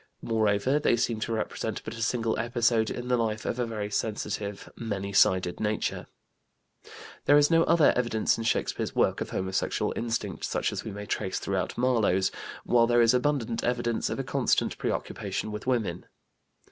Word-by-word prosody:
Moreover, 110 +4 +2
they 145 - +3
seem 115 -1 0
to 110 - -3
represent 110 -1 -3
but - - -5
a 115 - -7
single 115 -2 0
episode 115 -1 +1
in 125 0 -5
the 125 0 +2
life 110 -2 -1
of 120 - -2
a 120 - 0
very 105 -2 -4
sensitive, 105 -1 -3
many 100 -3 -4
sided 95 -2 +3
nature. 105 0 -2 1.2
There 145 - +6
is 145 +2 +4
no 165 0 +5
other 165 -3 +5
evidence 120 -3 +1
in 115 - -4
Shakespeare's 115 - -1
work - - +2
of - - -3
homosexual 95 0 -1
instinct 115 -5 -3
such - - -1
as - - -4
we - - -5
may 105 0 -7
trace 95 -2 -2
throughout 95 -1 -2
Marlowe's, 115 -7 +2 0.3
while 115 -1 +4
there 120 0 +4
is 115 - +5
abundant 125 -3 0
evidence 120 -1 0
of - - -3
a - - -2
constant - - +1
preoccupation 100 +2 -3
with 105 +3 -6
women. 110 -9 -1
115 Hz, 170 wpm, -28 LUFS, 105-120 Hz, 1.2 s, There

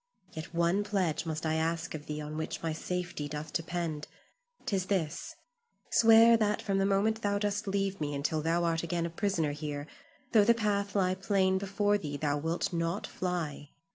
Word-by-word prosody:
Yet 160 0 -7
one 170 +4 +2
pledge 185 -6 -1
must 160 0 -3
I 155 - +1
ask 165 +1 -1
of 150 -1 -7
thee 150 0 -3
on 150 +1 -6
which 160 +1 -4
my 165 -1 0
safety 175 -2 -3
doth 150 +1 -6
depend. 165 -2 -2 0.6
'Tis 190 -3 -1
this: 180 -7 -2 0.6
Swear 230 0 +7
that 210 -1 +1
from 195 -3 0
the 195 - +2
moment 215 +3 +2
thou 200 -1 +1
dost 205 0 -1
leave 195 -2 -1
me 145 -1 -1
until 155 +2 -1
thou 165 +2 +1
art 165 -1 +1
again 170 0 -1
a 170 - -4
prisoner 170 -4 0
here, 145 -1 -4 0.5
though 215 -3 +6
the 235 +3 +5
path 205 -2 0
lie 185 -2 +3
plain 190 0 +1
before 205 +1 +1
thee 145 -5 -4
thou 145 -1 0
wilt 165 +4 -1
not 170 +4 -1
fly. 165 -6 -3
175 Hz, 185 wpm, -31 LUFS, 155-200 Hz, 0.6 s, Swear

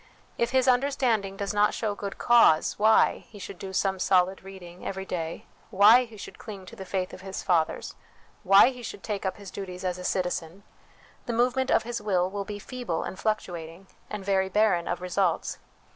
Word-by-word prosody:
If 235 - 0
his 260 0 +2
understanding 245 -6 +1
does 200 +1 -3
not 210 0 +3
show 215 -3 -1
good 200 -1 -6
cause 230 -11 +4
why 220 +1 +4
he 210 - -13
should 195 -1 -9
do 195 - -6
some 190 0 0
solid 185 0 +2
reading 180 -2 -11
every 190 0 -4
day, 165 -3 -4 0.2
why 220 +5 +6
he 225 -2 -14
should - - -10
cling 200 -4 -9
to - - -11
the 190 - -8
faith 185 -1 -2
of - - -10
his 190 0 -6
fathers, 170 -4 0 0.5
why 195 +4 +7
he 250 -2 -9
should 210 -4 -8
take 205 -3 -3
up 190 - -3
his 200 -2 -10
duties 185 -2 -7
as 180 0 -2
a - - -7
citizen, 180 0 -2 0.6
the 240 - -1
movement 250 +3 +1
of - - +3
his 235 -1 -4
will 185 -3 0
will 200 0 -4
be 210 0 -6
feeble 225 -5 -4
and 190 - -7
fluctuating, 175 -5 -3 0.2
and 210 -2 -6
very 190 -1 +1
barren 195 -4 +2
of - - -3
results. 180 -1 -1
195 Hz, 195 wpm, -27 LUFS, 185-215 Hz, 0.6 s, why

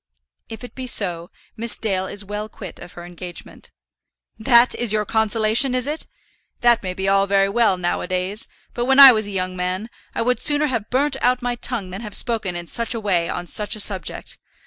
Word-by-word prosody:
"If 225 +2 -9
it 245 - -10
be 260 -1 -6
so, 175 -7 0 0.3
Miss 230 0 -3
Dale 190 -4 -1
is 205 +1 -5
well 210 +2 -5
quit 195 -4 -10
of 175 - -11
her 175 - -10
engagement." 175 0 -9 0.7
"That 235 +2 +5
is 240 -3 -1
your 215 -1 +1
consolation, 220 +4 +2
is 250 -1 0
it? 300 +2 -3 0.5
That 235 -1 +4
may 185 -1 -5
be 190 +1 -3
all 195 0 +3
very 195 0 +2
well 220 -3 +2
now 175 -1 -1
a - - -5
days; 185 +3 -1 0.3
but 240 - -2
when 265 +2 +3
I 275 -1 +12
was 215 -3 0
a - - -6
young 185 -2 -3
man, 185 +5 -3 0.2
I - - 0
would 250 +1 +1
sooner 295 0 +2
have 230 -7 -3
burnt 270 +2 0
out 250 0 +1
my 245 0 -1
tongue 235 -5 -3
than 190 +4 -7
have 210 -3 -6
spoken 220 -7 -2
in 175 0 -5
such 235 +6 -3
a - - -3
way 180 -6 0
on 175 - -4
such 210 +4 -1
a - - -7
subject. 190 -5 +1
215 Hz, 215 wpm, -21 LUFS, 185-240 Hz, 0.7 s, I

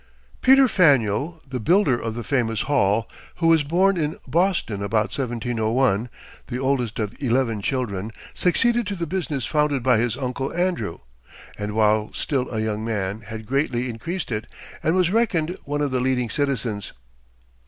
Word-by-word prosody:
Peter 265 0 +7
Faneuil, 145 - +2
the 130 -1 -4
builder 170 - +3
of 115 -1 -4
the 120 - -4
famous 115 -3 0
Hall, 115 -6 +2 0.3
who 170 - -2
was 165 -1 +5
born 180 +6 +2
in 155 -1 -1
Boston 170 - +1
about 105 +2 0
1701, 120 -2 0 0.4
the 125 - -3
oldest 130 -4 0
of 105 -2 -2
eleven 120 -4 +1
children, 110 -5 -2 0.2
succeeded 235 +6 +2
to 200 - -2
the 170 -2 -3
business 160 -7 -2
founded 150 -3 +1
by 125 -3 +4
his 120 +1 0
uncle 130 0 -3
Andrew, 175 - -1 0.5
and 105 0 -4
while 110 0 +2
still 135 -4 -1
a 110 - -3
young 110 0 -2
man 105 -2 -2
had 110 +1 -8
greatly 130 -1 0
increased 165 +9 -5
it, 110 -1 -4 0.3
and 160 - +1
was 180 -2 +3
reckoned 185 -7 +1
one 145 +1 -2
of 145 -2 0
the 130 - +1
leading 125 -3 0
citizens. 115 -7 -2
130 Hz, 160 wpm, -23 LUFS, 110-155 Hz, 0.5 s, Peter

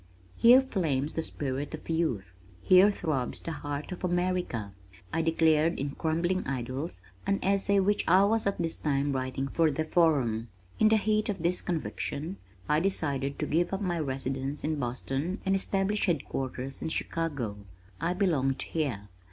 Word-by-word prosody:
"Here 245 +3 +7
flames 155 - 0
the 160 - -1
spirit 140 -1 -3
of 155 - -13
youth. 155 - -1 0.3
Here 185 +2 +7
throbs 155 -10 -2
the 165 - -5
heart 145 +1 -5
of 180 - -7
America," 175 - -1 0.4
I 165 - +2
declared 160 0 +3
in 140 +1 -2
Crumbling 170 +5 0
Idols, 130 - -3 0.3
an 195 - +2
essay 200 +1 +3
which 205 +2 +1
I 185 +3 +6
was 220 0 +2
at 200 - 0
this 165 -2 -1
time 140 -1 0
writing 130 +1 -2
for 160 +3 +2
the 155 +2 -1
Forum. 135 -10 +2 0.3
In 215 - +6
the 220 - +5
heat 215 0 +1
of 195 -5 -3
this 175 +2 +1
conviction, 165 0 -3 0.3
I 150 - +3
decided 140 -7 0
to - - -1
give 175 +3 +1
up 195 - -2
my 175 -3 -1
residence 135 0 -3
in 155 -1 -1
Boston 135 - -2
and 195 0 +3
establish 195 +2 +1
headquarters 135 -4 -3
in - - -2
Chicago. 145 -11 -2 0.4
I 175 +2 0
belonged 140 -9 +1
here. 125 -11 -2
160 Hz, 160 wpm, -29 LUFS, 135-185 Hz, 0.4 s, Here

